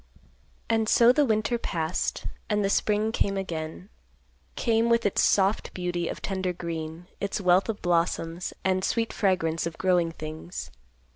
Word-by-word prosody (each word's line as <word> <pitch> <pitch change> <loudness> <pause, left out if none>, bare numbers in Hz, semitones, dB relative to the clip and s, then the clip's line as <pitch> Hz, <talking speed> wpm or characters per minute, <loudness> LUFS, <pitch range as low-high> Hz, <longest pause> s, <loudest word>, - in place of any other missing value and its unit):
And 225 -1 +1
so 235 0 +6
the 285 +2 +3
winter 220 +2 +1
passed, 165 -5 -2 0.2
and 210 -1 +1
the 195 - +1
spring 210 +2 +1
came 200 -3 0
again; 170 0 -5 0.7
came, 230 -1 +2
with 235 0 +3
its 205 - +2
soft 195 +1 +2
beauty 175 -2 -2
of - - -6
tender 190 -2 -1
green; 165 -1 -5
its 200 +1 -2
wealth 185 +2 +3
of 215 - -3
blossoms, 170 0 0
and 185 0 +2
sweet 225 +3 0
fragrance 170 -5 +1
of 165 - -7
growing 180 -3 +2
things. 155 +2 -7
185 Hz, 150 wpm, -27 LUFS, 170-215 Hz, 0.7 s, so